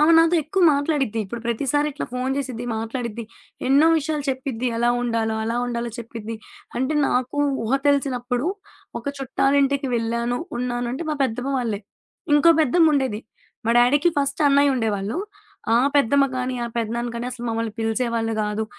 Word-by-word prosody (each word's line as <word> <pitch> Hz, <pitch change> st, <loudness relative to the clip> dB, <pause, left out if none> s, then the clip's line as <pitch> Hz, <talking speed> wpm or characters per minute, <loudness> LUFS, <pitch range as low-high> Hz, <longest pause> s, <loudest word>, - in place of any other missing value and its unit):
ఆమ 305 Hz, +2 st, +5 dB
నాతో 330 Hz, +1 st, +4 dB
ఎక్కువ 355 Hz, +6 st, -1 dB
మాట్లాడిద్ది. 280 Hz, -6 st, 0 dB
ఇప్పుడు 230 Hz, +5 st, -6 dB
ప్రతిసారి 280 Hz, +5 st, 0 dB
ఇట్లా 295 Hz, -, -4 dB
ఫోను 255 Hz, +1 st, -1 dB
చేసిద్ది 250 Hz, -4 st, -4 dB
మాట్లాడిద్ది. 230 Hz, 0 st, -4 dB, 0.4 s
ఎన్నో 285 Hz, +4 st, +5 dB
విషయాలు 300 Hz, -1 st, -3 dB
చెప్పిద్ది. 260 Hz, -2 st, -3 dB
ఎలా 240 Hz, +1 st, +2 dB
ఉండాల 230 Hz, -2 st, 0 dB
అలా 230 Hz, +2 st, -1 dB
ఉండాల 235 Hz, -1 st, -3 dB
చెప్పిద్ది. 230 Hz, -1 st, -6 dB, 0.4 s
అంటే 260 Hz, +5 st, 0 dB
నాకు 255 Hz, +3 st, -1 dB, 0.3 s
ఊహ 225 Hz, -, -2 dB
తెలిసినప్పుడు 255 Hz, -2 st, +1 dB, 0.5 s
ఒక -, -, -12 dB
చుట్టాలింటికి 275 Hz, +1 st, +1 dB
వెళ్ళాను, 235 Hz, +1 st, -1 dB, 0.2 s
ఉన్నానంటే 245 Hz, +3 st, -2 dB
మా -, -, 0 dB
పెద్దమ్మ 250 Hz, +3 st, -3 dB
వాళ్ళే. 220 Hz, -5 st, -2 dB, 0.5 s
ఇంకో 295 Hz, +3 st, +6 dB
పెద్దమ్ముండేది. 280 Hz, -6 st, +3 dB, 0.5 s
మా -, -, +3 dB
డ్యాడీకి 285 Hz, +8 st, +4 dB
ఫస్ట్ 280 Hz, +2 st, -1 dB
అన్నయ్య 280 Hz, 0 st, +4 dB
ఉండేవాళ్ళు. 215 Hz, -2 st, -1 dB, 0.6 s
ఆ -, -, +6 dB, 0.2 s
పెద్దమ్మ 280 Hz, +1 st, +4 dB
గాని, 255 Hz, 0 st, -2 dB
ఆ -, -, -2 dB
పెద్దనాన్న 235 Hz, +1 st, -2 dB
గాని 235 Hz, +1 st, -3 dB
అసలు 245 Hz, -1 st, -7 dB
మమ్మల్ని 225 Hz, -1 st, -2 dB
పిలిసేవాళ్ళు 225 Hz, 0 st, -1 dB
గాదు. 210 Hz, +1 st, -1 dB
245 Hz, 145 wpm, -23 LUFS, 230-280 Hz, 0.6 s, ఇంకో